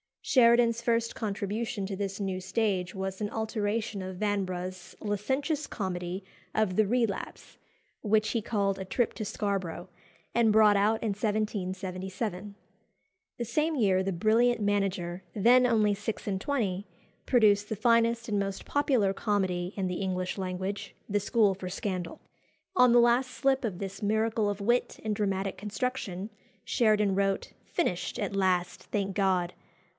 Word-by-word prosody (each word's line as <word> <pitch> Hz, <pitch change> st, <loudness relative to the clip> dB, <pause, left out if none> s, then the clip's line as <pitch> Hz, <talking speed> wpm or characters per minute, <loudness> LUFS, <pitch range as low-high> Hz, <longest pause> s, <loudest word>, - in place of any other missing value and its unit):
Sheridan's 235 Hz, -2 st, +4 dB
first 230 Hz, -1 st, +1 dB
contribution 210 Hz, +1 st, -3 dB
to 195 Hz, -, -4 dB
this 195 Hz, 0 st, -3 dB
new 190 Hz, -2 st, -2 dB
stage 190 Hz, -2 st, -1 dB
was 190 Hz, +1 st, -4 dB
an 205 Hz, -, -1 dB
alteration 220 Hz, -1 st, -2 dB
of 185 Hz, 0 st, -6 dB
Vanbrugh's 185 Hz, -3 st, -3 dB
licentious 265 Hz, +9 st, -1 dB
comedy 185 Hz, -2 st, -4 dB, 0.3 s
of 215 Hz, -4 st, +1 dB
"The 215 Hz, 0 st, +3 dB
Relapse," 230 Hz, -2 st, -2 dB, 0.4 s
which 215 Hz, 0 st, +2 dB
he 230 Hz, -, 0 dB
called 200 Hz, -3 st, 0 dB
"A 190 Hz, -, -4 dB
Trip 235 Hz, +5 st, 0 dB
to 215 Hz, -, -4 dB
Scarborough," 195 Hz, -5 st, -3 dB, 0.4 s
and 230 Hz, -2 st, +4 dB
brought 210 Hz, -1 st, +6 dB
out 215 Hz, +3 st, +2 dB
in 225 Hz, -, 0 dB
1777. 200 Hz, -1 st, -3 dB, 0.8 s
The 235 Hz, -, -2 dB
same 310 Hz, +7 st, 0 dB
year 195 Hz, -7 st, +3 dB
the 195 Hz, +1 st, -1 dB
brilliant 225 Hz, +6 st, +3 dB
manager, 190 Hz, -3 st, -1 dB
then 245 Hz, +4 st, +5 dB
only 215 Hz, -3 st, +3 dB
six 210 Hz, +2 st, -4 dB
and 195 Hz, -2 st, -1 dB
twenty, 205 Hz, -6 st, -1 dB, 0.4 s
produced 210 Hz, -4 st, +4 dB
the 220 Hz, -, -1 dB
finest 230 Hz, +2 st, +2 dB
and 205 Hz, -1 st, +1 dB
most 195 Hz, -1 st, -3 dB
popular 255 Hz, -9 st, +2 dB
comedy 190 Hz, -3 st, -1 dB
in 195 Hz, -2 st, -1 dB
the 180 Hz, +1 st, -3 dB
English 185 Hz, -1 st, -2 dB
language, 190 Hz, +1 st, -4 dB
"The 205 Hz, 0 st, +2 dB
School 205 Hz, 0 st, +3 dB
for 185 Hz, -1 st, -6 dB
Scandal." 180 Hz, -2 st, -4 dB, 0.5 s
On 250 Hz, -7 st, +6 dB
the 240 Hz, -, +7 dB
last 240 Hz, +2 st, +4 dB
slip 265 Hz, +2 st, +1 dB
of 190 Hz, -5 st, -3 dB
this 195 Hz, 0 st, -6 dB
miracle 220 Hz, 0 st, +1 dB
of 205 Hz, 0 st, -3 dB
wit 240 Hz, +4 st, +1 dB
and 215 Hz, -1 st, -1 dB
dramatic 195 Hz, -2 st, -1 dB
construction 210 Hz, -1 st, -3 dB, 0.3 s
Sheridan 210 Hz, -4 st, +2 dB
wrote 195 Hz, 0 st, 0 dB
"Finished 190 Hz, -, -1 dB
at 200 Hz, -4 st, -2 dB
last, 185 Hz, -2 st, +1 dB
thank 195 Hz, -2 st, -2 dB
God! 185 Hz, -3 st, +1 dB
205 Hz, 150 wpm, -29 LUFS, 190-225 Hz, 0.8 s, the